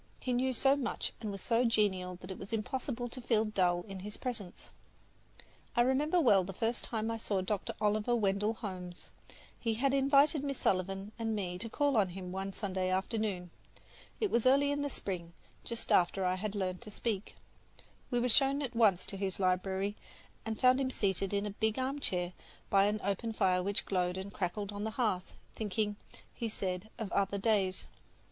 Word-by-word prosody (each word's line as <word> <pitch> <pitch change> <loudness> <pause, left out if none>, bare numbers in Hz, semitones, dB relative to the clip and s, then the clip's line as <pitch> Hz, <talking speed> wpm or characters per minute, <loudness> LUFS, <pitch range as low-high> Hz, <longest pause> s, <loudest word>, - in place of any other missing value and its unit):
He 250 - -1
knew 255 +2 +2
so 270 +2 +4
much 275 -3 -2
and 215 - -3
was 195 -1 -6
so 235 +1 +3
genial 195 -6 +2
that 185 - -7
it 190 - -7
was 195 - -8
impossible 245 +2 -2
to 255 +2 -7
feel 225 -2 +2
dull 180 -4 +1
in 195 -3 -7
his 210 +3 -7
presence. 220 -8 -5 1.0
I 240 - +5
remember 285 +7 +3
well 205 - +5
the 195 +2 -6
first 225 +5 -1
time 225 -1 -2
I 225 - -2
saw 205 -3 -1
Dr. 195 +1 -2
Oliver 215 +3 +2
Wendell 210 0 +1
Holmes. 180 -5 -7 0.5
He 225 -2 0
had 270 +4 +2
invited 275 +2 +4
Miss 275 -2 -2
Sullivan 195 +2 0
and 225 -1 0
me 180 -3 -3
to 230 +4 -5
call 285 +2 +2
on 200 -3 +4
him 180 0 -6
one 195 +1 -3
Sunday 190 -2 -2
afternoon. 190 -2 -1 0.7
It 425 - +1
was 235 +1 +3
early 280 +2 +5
in 285 0 0
the 285 - -1
spring, 175 -9 -5 0.3
just 235 -1 -5
after 185 +2 +4
I 180 - +2
had 205 +2 -3
learned 185 -1 -2
to 230 - -9
speak. 210 -1 -3 0.7
We 245 - +1
were 245 - +2
shown 275 +4 +3
at 245 -3 -4
once 200 -6 +4
to 195 - -4
his 190 -1 -2
library 190 +2 +1 0.5
where 225 0 -2
we - - -17
found 255 +1 +5
him 260 - +1
seated 195 -5 0
in 200 0 0
a 205 - -2
big 220 +2 0
armchair 255 -10 -1 0.4
by 195 0 +6
an 210 +1 +1
open 200 +4 -1
fire 185 -3 +3
which 200 +2 -1
glowed 180 -1 0
and 190 +1 -6
crackled 200 +2 -2
on 205 0 -4
the 220 - -1
hearth, 200 -7 0 0.2
thinking, 210 0 -1 0.4
he 230 -2 -3
said, 190 0 -3
of 220 -5 -4
other 200 0 +1
days. 195 -3 +1
210 Hz, 195 wpm, -33 LUFS, 190-240 Hz, 1.0 s, by